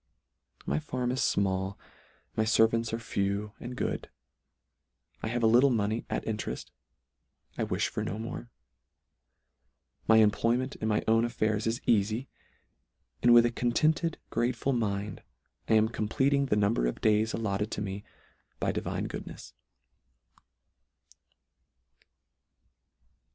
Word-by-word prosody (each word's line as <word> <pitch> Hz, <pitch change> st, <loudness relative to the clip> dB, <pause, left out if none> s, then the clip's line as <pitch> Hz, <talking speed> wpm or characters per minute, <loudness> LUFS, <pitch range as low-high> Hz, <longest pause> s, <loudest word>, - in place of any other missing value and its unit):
My 70 Hz, -, 0 dB
farm 125 Hz, +6 st, -2 dB
is 130 Hz, -, -2 dB
fmall, 95 Hz, -2 st, 0 dB, 0.6 s
my 110 Hz, -, +2 dB
fervants 115 Hz, +1 st, +3 dB
are 115 Hz, -, -1 dB
few, 100 Hz, -2 st, -2 dB
and 125 Hz, +1 st, -7 dB
good; -, -, -3 dB, 1.1 s
I -, -, -3 dB
have 120 Hz, +1 st, -1 dB
a -, -, +5 dB
little 120 Hz, +5 st, +6 dB
money 110 Hz, -1 st, 0 dB
at -, -, -2 dB
intereft; 110 Hz, -1 st, -4 dB, 0.8 s
I -, -, -1 dB
wifh -, -, 0 dB
for -, -, -3 dB
no 100 Hz, -, -3 dB
more: 115 Hz, +1 st, -6 dB, 1.6 s
my 110 Hz, -, +6 dB
employment 115 Hz, +4 st, +2 dB
in 110 Hz, -, -3 dB
my 105 Hz, -1 st, +1 dB
own 115 Hz, +1 st, +4 dB
af 120 Hz, -, -2 dB
fairs 110 Hz, 0 st, 0 dB
is 115 Hz, +1 st, -1 dB
eafy; 110 Hz, +3 st, +1 dB, 1.0 s
and 120 Hz, -, +5 dB
with 120 Hz, 0 st, +8 dB
a 120 Hz, -, +1 dB
contented 155 Hz, +8 st, +1 dB
grateful 120 Hz, +3 st, 0 dB
mind, 100 Hz, -4 st, -2 dB, 0.5 s
I 110 Hz, -, +5 dB
am 110 Hz, 0 st, +5 dB
compleating 135 Hz, +6 st, +1 dB
the 115 Hz, -, +2 dB
number 100 Hz, -, +2 dB
of -, -, -3 dB
days 110 Hz, +1 st, +2 dB
allotted 105 Hz, -1 st, -1 dB
to -, -, -3 dB
me 100 Hz, 0 st, -5 dB, 0.6 s
by -, -, +1 dB
divine -, -, -3 dB
goodnefs. -, -, -8 dB
110 Hz, 130 wpm, -29 LUFS, 105-120 Hz, 1.6 s, with